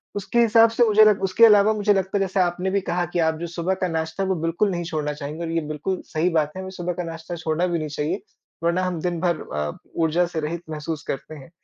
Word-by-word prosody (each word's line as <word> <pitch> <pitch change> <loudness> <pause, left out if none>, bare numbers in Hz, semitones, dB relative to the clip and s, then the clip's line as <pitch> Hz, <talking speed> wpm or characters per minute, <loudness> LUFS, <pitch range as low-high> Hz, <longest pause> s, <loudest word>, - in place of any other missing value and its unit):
उसके 205 +4 -1
हिसाब 230 0 +6
से 230 +2 +2
मुझे 215 0 +6
लग 210 -2 +4
उसके 195 +4 +5
अलावा 210 -1 +6
मुझे 210 -1 +2
लगता 190 0 0
है - - 0
जैसे 195 0 0
आपने 180 +1 +1
भी 200 0 +1
कहा 175 0 0
कि 175 - 0
आप 160 - +1
जो 170 - -4
सुबह 170 +2 -2
का - - +2
नाश्ता 160 +2 -2
है 190 - -2
वो 190 - +2
बिल्कुल 165 +5 +1
नहीं 175 -1 -2
छोड़ना 155 -3 -2
चाहेंगी 150 +2 -6
और 165 - -3
ये 165 0 0
बिल्कुल 155 +5 -3
सही 160 +3 0
बात 155 -3 +1
है, 190 - -5
हमें 190 0 -7
सुबह 175 0 -2
का 180 - -4
नाश्ता 165 +1 -6
छोड़ना 165 +1 -1
भी 170 -1 -1
नहीं 155 - -3
चाहिए, 150 +6 -2 0.4
वरना 170 +2 +1
हम 180 -2 -2
दिनभर 175 -1 0 0.2
अ, 75 0 -1 0.2
ऊर्जा 165 +1 +2
से 170 -2 -4
रहित 160 +2 -3
महसूस 155 -1 -4
करते 150 +3 -5
हैं। 145 +1 -12
175 Hz, 260 wpm, -23 LUFS, 160-190 Hz, 0.4 s, हिसाब